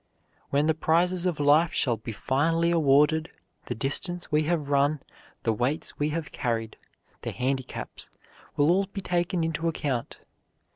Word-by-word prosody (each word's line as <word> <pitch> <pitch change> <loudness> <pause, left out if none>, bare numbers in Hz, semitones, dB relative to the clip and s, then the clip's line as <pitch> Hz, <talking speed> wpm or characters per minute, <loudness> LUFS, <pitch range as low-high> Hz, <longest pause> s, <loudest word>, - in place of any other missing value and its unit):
When 145 +2 +2
the 160 - +3
prizes 175 +3 +2
of 170 -5 -2
life 150 +3 +4
shall 120 -3 +1
be 110 +1 -7
finally 160 - +1
awarded, 155 0 +3 0.4
the - - -3
distance 170 - -1
we 150 0 +2
have 155 -3 -1
run, 145 +1 +2 0.4
the 115 - +2
weights 125 +8 -2
we 150 +1 +1
have 155 0 -4
carried, 115 -4 -2 0.5
the - - -3
handicaps, 130 0 -4 0.5
will 145 +3 +4
all 195 +2 +2
be 200 0 -6
taken 175 -1 0
into 165 0 -1
account. 140 -7 -2
150 Hz, 150 wpm, -27 LUFS, 135-170 Hz, 0.5 s, life